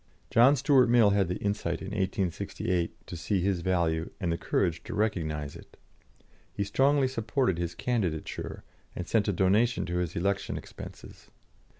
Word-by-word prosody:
John 125 +5 +6
Stuart 135 -2 +4
Mill 115 -3 +5
had 100 -2 +2
the 90 +2 -2
insight 100 -5 -2
in 95 - -6
1868 95 -3 -2
to - - -7
see 85 +4 -1
his 95 -1 0
value, 85 -2 0
and 85 -3 -1
the 85 - 0
courage 85 -1 0
to - - -5
recognise 80 -9 -1
it. - - -14 0.7
He 100 - -2
strongly 135 +7 +3
supported 115 - 0
his 85 -1 -3
candidature, 95 -9 -2 0.3
and 90 - -5
sent 110 -2 +2
a - - +3
donation 100 +6 +2
to 90 0 -2
his 90 -2 -2
election 100 +3 -1
expenses. - - -11
95 Hz, 160 wpm, -29 LUFS, 85-110 Hz, 0.7 s, John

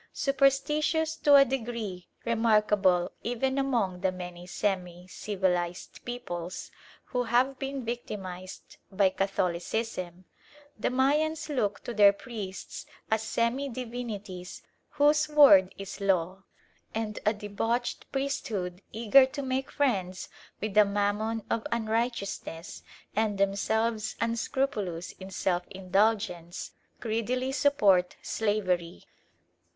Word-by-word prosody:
Superstitious 300 +4 +2
to 290 -1 +6
a 275 0 +8
degree 230 -8 -4 0.2
remarkable 210 -6 +3
even 265 +3 -1
among 225 -10 0
the 190 -1 +2
many 180 -1 -8
semi 180 -2 -2
civilised 180 -3 -2
peoples 185 -8 -5 0.3
who 250 -1 -2
have 255 +3 +2
been 270 -2 -4
victimised 190 -6 -6
by 195 0 +4
Catholicism, 185 0 -2 0.5
the 215 - -1
Mayans 300 +5 +1
look 210 -8 -1
to 240 - -5
their 205 -2 +7
priests 200 -5 -7 0.2
as 220 0 +3
semi 235 +5 0
divinities 225 -7 -6 0.3
whose 300 +1 +3
word 275 -12 +7
is 195 +1 -7
law; 190 0 0 0.5
and 220 -1 -2
a 210 - +4
debauched 225 +3 -2
priesthood, 210 -10 -2
eager 235 +5 +5
to 280 +2 -5
make 260 0 -2
friends 190 -10 -1 0.3
with 215 -1 -3
the 210 +1 +7
Mammon 205 +2 -1
of 225 - -1
Unrighteousness, 220 -6 -2 0.3
and 215 -1 +1
themselves 215 +3 0
unscrupulous 230 -6 -1
in 190 0 -8
self 180 -1 -1
indulgence, 190 -2 0 0.3
greedily 245 +3 -1
support 205 -11 +3
slavery. 185 - -1
215 Hz, 105 wpm, -29 LUFS, 190-245 Hz, 0.5 s, a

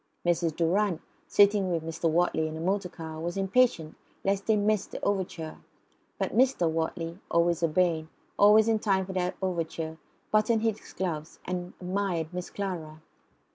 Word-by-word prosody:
Mrs. 170 -2 +1
Durrant, 180 +2 +1 0.3
sitting 205 -2 +4
with 165 -2 -1
Mr. 165 +1 -1
Wortley 160 -1 +2
in 155 0 -5
a - - -6
motor 190 +2 0
car, 160 -2 -8
was 170 +3 -3
impatient 195 -5 +2 0.3
lest 195 0 0
they 220 - +5
should 205 - +1
miss 210 -1 +1
the - - -7
overture. 180 -5 -2 0.6
But - - -2
Mr. 250 -8 +3
Wortley, 165 +2 -2
always 170 0 +2
urbane, 165 -1 +1 0.3
always 210 +2 +6
in 225 -1 +3
time 195 -3 +1
for 190 - -6
the 180 -1 -1
overture, 165 -3 -3 0.3
buttoned 215 +1 +3
his 220 -2 +1
gloves, 160 -4 -4
and 180 -1 -4
admired 180 -3 -2
Miss 180 0 -4
Clara. 160 -6 -5
180 Hz, 160 wpm, -28 LUFS, 165-200 Hz, 0.6 s, always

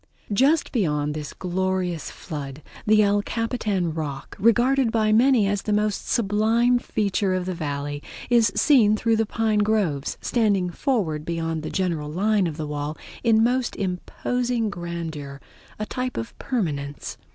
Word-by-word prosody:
Just 280 +9 +3
beyond 150 - 0
this 150 -1 -5
glorious 185 -2 -2
flood 145 -1 -7 0.2
the 215 0 +6
El 205 0 +3
Capitan 210 -7 -1
Rock, 145 -4 -5
regarded 240 +3 +3
by 215 -2 +2
many 240 -1 +5
as 200 0 0
the 215 - -3
most 210 0 0
sublime 230 +3 +2
feature 200 -4 0
of 185 -1 -2
the 185 - -2
Valley, 145 -3 -4 0.3
is 230 -4 +4
seen 220 -7 +5
through 225 +1 +2
the 225 -1 +1
pine 220 -1 +1
groves, 205 -10 0
standing 200 -6 +1
forward 175 - -1
beyond 165 -1 -2
the 155 - -5
general 170 -6 -1
line 200 +2 +2
of 155 -2 -5
the 155 - -3
wall 150 +1 -4 0.3
in 225 -2 +4
most 250 +1 +1
imposing 225 +5 -2
grandeur, 165 -6 -6 0.4
a 215 - -3
type 255 +2 -4
of 115 - -5
permanence. 145 - -3
200 Hz, 150 wpm, -24 LUFS, 160-225 Hz, 0.4 s, the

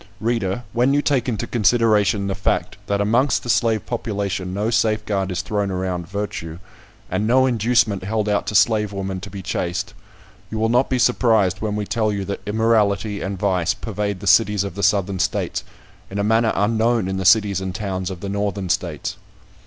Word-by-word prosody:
Reader, 115 -1 -1
when 125 +4 +2
you 145 - +2
take 130 -3 +1
into 110 -4 -2
consideration 110 -3 +2
the 100 - -1
fact, 95 0 -1
that 100 0 0
amongst 120 +7 +2
the 120 - +1
slave 110 -2 +1
population 100 -6 -3
no 105 +4 -1
safeguard 110 -4 0
is 90 - -2
thrown 105 -2 -1
around 90 -2 -3
virtue, 100 -4 -5 0.5
and 100 +4 0
no 130 +3 +4
inducement 115 -5 +2
held 105 +2 -1
out 105 -1 0
to 105 - -3
slave 105 -1 +3
women 95 -1 -3
to 100 +2 -8
be 100 0 -8
chaste, 85 0 -3 0.6
you 110 - -4
will 110 +1 +1
not 125 +3 +2
be 130 - +1
surprised 110 -6 +2
when 105 -1 -2
we 105 -1 -2
tell 110 0 0
you 100 -1 -3
that 100 +1 -4
immorality 105 -2 +1
and 95 +1 -3
vice 90 -3 +1
pervade 105 -3 -4
the - - -7
cities 105 0 +4
of 100 -3 -5
the 100 - -5
Southern 100 -1 +1
States 95 - -1 0.5
in 100 - -6
a 100 - 0
manner 110 +1 +3
unknown 110 0 +1
in 95 0 -2
the 95 - -2
cities 100 0 +4
and 95 -1 -4
towns 95 -3 -3
of 90 -3 -7
the 100 - -4
Northern 100 -1 -2
States. - - -2
105 Hz, 190 wpm, -21 LUFS, 95-110 Hz, 0.6 s, no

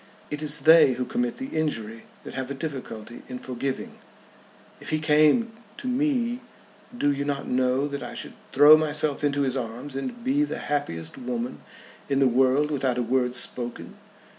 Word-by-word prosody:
It 150 0 -3
is 150 -1 +1
they 160 -2 +7
who 125 +1 -3
commit 240 - -2
the 265 0 -5
injury 115 -8 -2 0.2
that - - -9
have 130 -1 -4
a 140 - -4
difficulty 130 -6 -7
in 125 - -5
forgiving. 130 +1 -5 0.8
If - - -8
he 155 - +1
came 155 +10 +3 0.3
to 255 - -6
me 250 -2 0 0.6
do 145 -10 +2
you 140 0 -2
not 140 -1 -3
know 130 +2 +1
that 140 -1 -5
I - - -7
should - - -6 0.2
throw 145 +3 +8
myself 150 -1 0
into 145 -1 +1
his 130 -1 0
arms 125 +2 -5
and 240 - -5
be 275 +3 +2
the 295 - -3
happiest 85 - -3
woman 120 -1 -4 0.5
in 140 - +1
the 135 -1 +4
world 130 +4 +3
without 130 -4 0
a 125 - +1
word 125 +1 0
spoken?" 120 -1 -1
140 Hz, 175 wpm, -25 LUFS, 125-155 Hz, 0.8 s, throw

